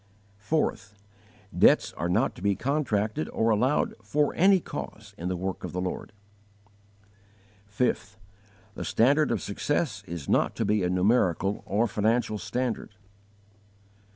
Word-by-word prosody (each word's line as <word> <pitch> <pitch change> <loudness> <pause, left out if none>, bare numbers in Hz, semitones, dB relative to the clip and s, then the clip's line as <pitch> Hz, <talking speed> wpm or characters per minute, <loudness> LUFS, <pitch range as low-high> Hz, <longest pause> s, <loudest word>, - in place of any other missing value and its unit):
4. 150 +10 +1 0.8
Debts - - +4
are 85 +3 -3
not 90 - +2
to - - -13
be 100 0 +2
contracted 110 - -1
or 115 0 +1
allowed 125 +7 +2
for 145 +8 0
any 190 +2 +5
cause 110 -10 -8
in 85 - -5
the 90 - -1
work 95 +1 -4
of - - -5
the 90 - -2
Lord. 90 +3 -4 1.6
5. 105 -1 -1 0.6
The - - -6
standard 140 +6 +3
of 115 -5 -1
success 110 - -2
is 85 -4 -6
not - - +2
to - - -1
be 105 0 +2
a 90 - 0
numerical 95 0 +2
or 105 +4 +2
financial 110 0 0
standard. 125 -4 -3
105 Hz, 135 wpm, -27 LUFS, 95-125 Hz, 1.6 s, any